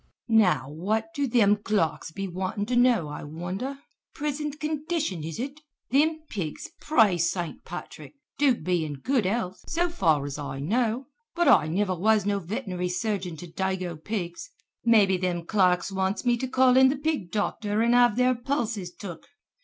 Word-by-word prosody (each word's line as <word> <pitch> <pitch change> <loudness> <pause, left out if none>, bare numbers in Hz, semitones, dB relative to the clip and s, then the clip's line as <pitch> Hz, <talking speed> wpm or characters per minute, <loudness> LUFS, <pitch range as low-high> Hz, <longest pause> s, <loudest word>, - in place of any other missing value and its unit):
"Now 200 - +3
what 205 - -2
do 285 -3 0
thim 210 -4 +4
clerks 200 -7 -1
be 195 +4 -4
wantin' 185 +3 -3
to 245 +3 -1
know, 245 -9 +4
I 150 - -7
wonder! 180 - -5 0.4
'Prisint 295 0 -3
condition, 305 - -2
'is 160 +3 -5
ut? 275 +4 -5 0.3
Thim 315 +4 +3
pigs, 190 - -5
praise 200 - +3
St. 175 -3 -4
Patrick, - - -9 0.2
do 280 -4 +4
be 180 -5 -1
in 150 -2 -4
good 245 - 0
health, 190 -2 -2
so 345 +1 0
far 160 - +2
as 145 +1 -5
I 140 -2 -5
know, 230 - 0 0.3
but 345 -1 +2
I 150 - +6
niver 185 +4 0
was 210 +3 +2
no 200 -1 +1
veternairy 185 -2 -3
surgeon 185 -3 -2
to 175 - -8
dago 185 0 -2
pigs. 175 +1 -5 0.3
Mebby 205 -5 +4
thim 175 -2 -2
clerks 185 -1 +2
wants 190 +4 -1
me 240 -1 +4
to 260 - -3
call 255 0 +4
in 260 0 +7
the 275 - 0
pig 290 - -2
docther 210 +1 0
an' 235 - +3
have 245 -3 +5
their 250 +1 +3
pulses 235 -7 -2
took. 175 -3 -9
205 Hz, 170 wpm, -26 LUFS, 180-255 Hz, 0.4 s, in